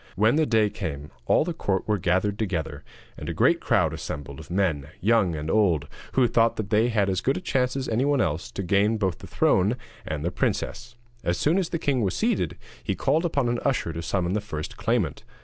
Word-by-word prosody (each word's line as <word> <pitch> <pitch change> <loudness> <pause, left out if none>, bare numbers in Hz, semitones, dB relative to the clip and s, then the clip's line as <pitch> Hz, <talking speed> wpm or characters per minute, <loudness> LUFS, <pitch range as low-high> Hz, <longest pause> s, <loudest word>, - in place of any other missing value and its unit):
When 110 +7 +3
the 155 -1 +2
day 110 -3 +3
came, 75 -7 -5 0.2
all - - +4
the 175 - -2
court 95 - -1
were 105 -2 +1
gathered 95 +3 +1
together, 90 -9 -3 0.4
and - - -5
a - - -3
great - - +4
crowd - - +2
assembled 70 -1 -6
of - - -11
men, 85 -7 0
young 100 -4 +3
and 75 0 -4
old, 85 -7 +2 0.3
who 130 -2 +4
thought 115 0 +3
that 105 -2 -5
they 110 +2 +4
had 105 -4 +2
as 95 -1 0
good 135 - +1
a - - -2
chance 130 -8 0
as 135 -1 -2
anyone 135 +5 +1
else 80 -3 -1
to 100 - -3
gain 100 +4 +2
both 95 -5 -1
the - - -10
throne 100 +6 +2 0.3
and 75 0 -4
the 85 - 0
princess. 120 +5 -2 0.3
As 85 - 0
soon 165 +6 +2
as 180 - -1
the 170 - -1
king 140 -5 0
was 95 -4 0
seated, - - 0 0.3
he - - -1
called 160 +3 +1
upon 140 -7 +1
an 120 0 0
usher 130 - 0
to 80 - -4
summon 90 +1 -1
the 105 - 0
first 80 -7 -6
claimant. - - -1
105 Hz, 220 wpm, -25 LUFS, 85-120 Hz, 0.4 s, all